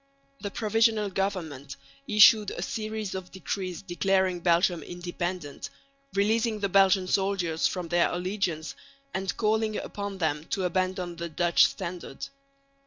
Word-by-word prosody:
The 205 - -4
Provisional 220 -1 +1
Government 165 -8 -3 0.3
issued 210 0 +7
a 175 - -4
series 215 -1 -4
of 190 -1 -6
decrees 185 -1 -4
declaring 190 0 +1
Belgium 175 0 +2
independent, 175 -3 -5 0.5
releasing 220 +2 +1
the 200 -1 -1
Belgian 190 0 +4
soldiers 185 -4 +1
from 180 -3 -4
their 175 0 +3
allegiance, 175 -4 -2 0.4
and 190 0 -2
calling 215 0 +1
upon 200 -1 -5
them 155 -3 -1
to 190 - -2
abandon 185 -1 -1
the 170 0 -4
Dutch 170 +2 +4
standard. 175 -6 -6
185 Hz, 125 wpm, -27 LUFS, 175-200 Hz, 0.5 s, issued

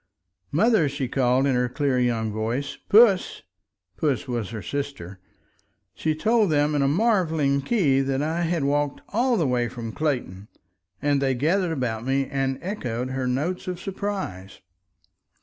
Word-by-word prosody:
"Mother!" 205 -2 +3
she 140 -1 -3
called 130 +1 +2
in 140 - +2
her 125 0 +1
clear 130 0 0
young 115 -3 0
voice. 115 +6 -2
"Puss!" 210 -3 +5 0.5
Puss 140 -3 0
was 120 -5 -3
her 110 -3 -6
sister. 140 -10 -5 0.7
She 155 -1 -1
told 220 +4 +2
them 150 0 +2
in 145 - +1
a 135 - +3
marveling 160 -6 +2
key 140 - +2
that 135 0 -1
I 160 +3 -1
had 170 -2 0
walked 145 0 0
all 240 +3 +1
the 165 - +1
way 125 -2 +1
from 115 -2 -6
Clayton, 120 -10 -3 0.6
and 145 -1 +2
they 135 -1 +1
gathered 170 +7 +1
about 120 -7 -2
me 135 +2 +1
and 135 -1 -2
echoed 130 - -3
her 130 -1 -2
notes 150 +10 -2
of 180 -1 -4
surprise. 190 - -5
140 Hz, 155 wpm, -24 LUFS, 125-170 Hz, 0.7 s, Puss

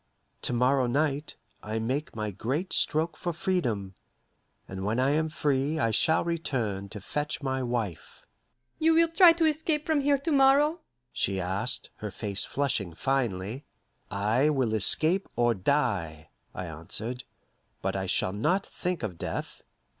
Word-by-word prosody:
To - - 0
morrow 125 +1 +3
night, 145 +3 0 0.3
I 110 +2 -4
make 130 +7 -2
my 105 -1 -3
great 135 - -2
stroke 160 +2 +1
for 175 - -3
freedom, 125 - -1 0.7
and 95 0 -6
when 110 +5 0
I 130 +2 +3
am 155 +2 +1
free 145 0 0
I 115 -5 +1
shall 160 +10 +2
return 120 - -2
to 105 - -7
fetch 150 +9 -3
my 130 -1 -1
wife." 120 -8 -4 0.6
"You 320 +1 +4
will 330 0 +5
try 345 +1 +7
to 330 -1 +1
escape 310 0 0
from 310 -3 +2
here 285 0 +3
to 320 +5 -3
morrow?" 285 +4 +4 0.3
she 95 -1 0
asked, 100 +8 0
her 105 - -5
face 100 0 -3
flushing 110 - -1
finely. 120 - -1 0.5
"I 110 +8 +2
will 130 -7 +1
escape 160 - +3
or 120 0 +3
die," 95 - -1 0.3
I 90 - -4
answered; 105 +10 -4 0.6
"but - - -1
I 95 0 -2
shall 95 0 +1
not 170 - +1
think 180 -6 -4
of 95 -6 -4
death. - - -5
130 Hz, 155 wpm, -28 LUFS, 105-165 Hz, 0.7 s, try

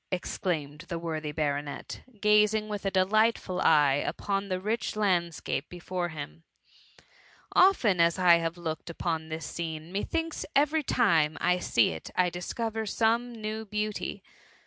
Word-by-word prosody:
'' - - -49
^xclaia>ed 160 -5 -3
the 170 - -2
worthy 160 -2 -4
baronet, 145 -2 -3 0.2
gazing 210 +1 +3
with 205 -2 -3
a - - +3
delightful 195 0 +2
eye 145 -2 +4
upon 200 0 -2
the 185 -1 -2
rich 215 +5 -2
landscape 170 -8 0
before 180 0 -4
him; 155 0 -8 0.6
^ - - -21 0.5
often 250 - +4
as 170 +1 +3
I 180 -2 +6
have 165 0 -2
looki^ 165 -2 -5
upon 160 -1 -3
this 160 -1 -5
scene, 160 0 -5
methinks 325 - -2
every 300 +3 +3
time 165 - +2
I 180 +1 +2
see 115 -9 +2
it 80 -1 -7
I 180 -1 +2
discover 220 +5 -3
some 230 +3 +1
new 220 -1 -5
beauty. 210 0 -3
180 Hz, 145 wpm, -28 LUFS, 160-215 Hz, 0.6 s, I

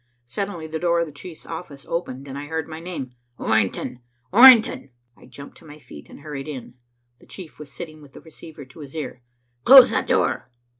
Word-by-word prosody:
Suddenly 170 +6 -5
the 160 0 -5
door 170 0 +1
of 170 - 0
the 155 - -11
chief's 160 +3 -12
office 160 -4 -9
opened, 140 -5 -5
and 135 - -8
I 145 +1 -7
heard 160 0 -4
my 160 0 -8
name. 165 -7 -7 0.3
"Orrington! 110 +3 -1 0.3
Orrington!" 240 - +7 0.3
I - - -19
jumped 140 +3 -13
to - - -19
my 150 -1 -12
feet 75 - -14
and - - -14
hurried 145 -2 -7
in. 130 -5 -8 0.5
The - - -21
chief 180 -6 -12
was 150 -2 -11
sitting 155 0 -10
with 145 -2 -17
the - - -13
receiver 160 -2 -13
to 130 +5 -17
his 145 0 -11
ear. 140 -5 -6 0.4
"Close 260 -1 +9
that - - -1
door!" - - 0
155 Hz, 200 wpm, -22 LUFS, 140-170 Hz, 0.5 s, Close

